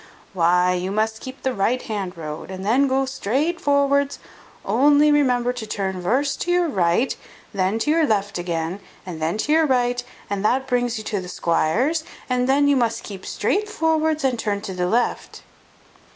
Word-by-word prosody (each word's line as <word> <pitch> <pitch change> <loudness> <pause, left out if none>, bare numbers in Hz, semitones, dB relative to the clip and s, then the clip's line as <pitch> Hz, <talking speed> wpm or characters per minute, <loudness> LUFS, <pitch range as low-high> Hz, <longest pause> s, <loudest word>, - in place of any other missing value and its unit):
"Why, 180 0 +3
you 180 +1 -2
must 220 +1 -1
keep 260 0 -10
the 260 - 0
right 230 +5 +1
hand 195 -5 -4
road, 155 0 -7
and 190 0 -6
then 260 +7 +3
gu 270 0 +1
strait 275 +7 -1
vorwards; 280 0 +2 0.5
only 290 +7 +4
remember 250 -4 +2
to 235 -3 -7
turn 190 -3 -3
vurst 270 +10 0
to 350 - -1
your 355 -1 +3
right, 190 - +1 0.4
and 200 - -8
then 190 +4 +1
to 295 +7 0
your 320 -1 +3
left 200 -4 0
again, 170 +1 -3 0.3
and 170 -4 -7
then 165 +5 0
to 285 - -1
your 320 0 +4
right, 245 -2 +1 0.2
and 200 -1 -3
that 260 +5 +2
brings 245 -2 0
you 215 - -6
to 205 -2 -2
the 180 - -8
squire's; 225 - +1 0.2
and 250 0 0
then 285 +1 +4
you 285 - +4
must 230 -3 0
keep 195 -2 -9
strait 420 +1 -1
vorwards, 320 -5 0
and 255 -3 +1
turn 205 -2 -1
to 195 - -6
the 180 -1 -1
left." 240 +5 -1
240 Hz, 190 wpm, -22 LUFS, 190-280 Hz, 0.5 s, only